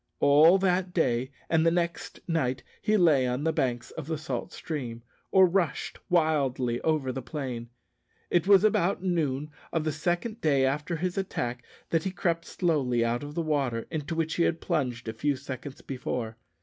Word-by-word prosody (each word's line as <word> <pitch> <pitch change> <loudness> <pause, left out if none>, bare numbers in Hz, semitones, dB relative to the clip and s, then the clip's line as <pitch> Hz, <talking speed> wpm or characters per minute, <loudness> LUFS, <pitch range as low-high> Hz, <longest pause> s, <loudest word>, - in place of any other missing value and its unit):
All 155 +6 +7
that 185 -1 0
day 130 -6 +1 0.2
and 160 -1 +3
the 165 - +5
next 170 0 -2
night 130 -7 0 0.2
he 215 0 +2
lay 150 -8 +4
on 125 +3 -1
the 160 0 +1
banks 125 -6 -1
of 155 -3 -7
the 160 -1 -2
salt 140 -5 -4
stream, 120 -7 -5 0.3
or 190 -1 +7
rushed 175 -5 -1
wildly 135 -8 +1
over 155 -5 +1
the 135 - -4
plain. 120 -3 -5 0.6
It 175 +2 +2
was 200 -1 +7
about 195 -3 +2
noon 150 -5 -1 0.2
of 160 - 0
the 155 - 0
second 175 +9 -2
day 140 -4 +3
after 150 +5 -1
his 180 +3 -2
attack 125 -10 -3 0.3
that 165 -1 +2
he 190 - -1
crept 170 -2 -1
slowly 135 -9 +1
out 120 +1 0
of 145 +1 -7
the 170 - 0
water, 135 -7 0
into 160 +1 -3
which 165 0 -1
he 170 - +3
had 165 -1 +1
plunged 120 -5 -2
a 110 - -2
few 140 +6 0
seconds 130 0 -7
before. 125 -4 -4
150 Hz, 180 wpm, -28 LUFS, 130-170 Hz, 0.6 s, All